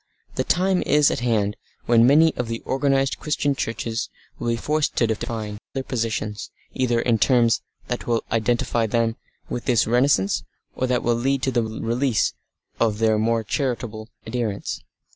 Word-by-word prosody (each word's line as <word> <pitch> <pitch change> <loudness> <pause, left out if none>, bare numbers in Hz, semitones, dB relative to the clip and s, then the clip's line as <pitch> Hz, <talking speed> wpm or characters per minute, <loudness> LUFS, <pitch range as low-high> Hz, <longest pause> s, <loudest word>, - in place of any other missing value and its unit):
The - - -1
time 185 0 +2
is 150 -1 +4
at - - -1
hand 110 -4 0 0.3
when 115 0 +5
many 160 +4 +5
of 125 - -2
the 115 0 -4
organised 135 0 +1
Christian 150 -1 0
churches 115 -2 -3 0.3
will - - -3
be 115 - +2
forced 150 +5 0
to 120 - +3
define 110 -1 -3 0.2
their 135 - -1
positions, 110 -4 -3 0.2
either 120 -3 +1
in 115 -2 +2
terms 120 -2 +3 0.3
that 125 - -4
will 115 -1 +1
identify 115 0 +1
them 115 +1 +1 0.3
with 120 - -4
this 120 -6 +3
renascence, 120 -4 +2 0.3
or 130 - -1
that 125 -1 0
will 120 - +2
lead 130 +3 0
to 130 - +1
the 120 - +2
release 115 +2 0 0.5
of 110 -3 +2
their 110 -1 +2
more 115 0 +1
liberal 120 -5 -2 0.2
adherents. 110 -3 -3
120 Hz, 160 wpm, -23 LUFS, 110-130 Hz, 0.5 s, when